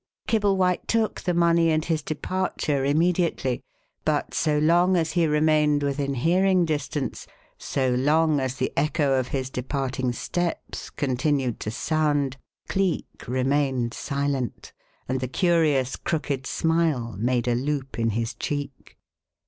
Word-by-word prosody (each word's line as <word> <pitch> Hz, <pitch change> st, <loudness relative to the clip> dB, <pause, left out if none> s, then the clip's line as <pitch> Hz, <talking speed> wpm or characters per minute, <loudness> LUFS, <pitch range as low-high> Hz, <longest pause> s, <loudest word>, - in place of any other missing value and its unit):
Kibblewhite 195 Hz, -4 st, +2 dB
took 225 Hz, -1 st, 0 dB
the 180 Hz, -, 0 dB
money 170 Hz, -1 st, +4 dB
and 155 Hz, 0 st, +1 dB
his 160 Hz, -2 st, 0 dB
departure 155 Hz, -2 st, -2 dB
immediately; 160 Hz, -3 st, +1 dB, 0.4 s
but -, -, 0 dB
so 150 Hz, -2 st, +1 dB
long 175 Hz, +4 st, +4 dB
as 165 Hz, -2 st, 0 dB
he 170 Hz, -2 st, +2 dB
remained 150 Hz, -1 st, +3 dB
within 140 Hz, 0 st, -1 dB
hearing 180 Hz, +6 st, +3 dB
distance 145 Hz, -3 st, -3 dB, 0.3 s
so 130 Hz, -2 st, 0 dB
long 150 Hz, +4 st, +3 dB
as 130 Hz, -1 st, -2 dB
the -, -, -2 dB
echo 150 Hz, -2 st, +1 dB
of 125 Hz, -, -2 dB
his 130 Hz, -1 st, -3 dB
departing 130 Hz, 0 st, -2 dB
steps 175 Hz, +7 st, -3 dB
continued 130 Hz, -2 st, -1 dB
to -, -, -4 dB
sound 145 Hz, +1 st, 0 dB, 0.3 s
Cleek 190 Hz, -3 st, -2 dB
remained 130 Hz, -1 st, 0 dB
silent, 140 Hz, -3 st, -3 dB, 0.3 s
and 130 Hz, +1 st, -1 dB
the 130 Hz, -, -2 dB
curious 150 Hz, -4 st, +2 dB
crooked 145 Hz, -5 st, -2 dB
smile 160 Hz, -8 st, 0 dB
made 120 Hz, +1 st, 0 dB
a 120 Hz, -, +3 dB
loop 135 Hz, 0 st, -2 dB
in 115 Hz, 0 st, +2 dB
his 115 Hz, +2 st, -2 dB
cheek. 140 Hz, +2 st, -5 dB
145 Hz, 135 wpm, -25 LUFS, 130-165 Hz, 0.4 s, money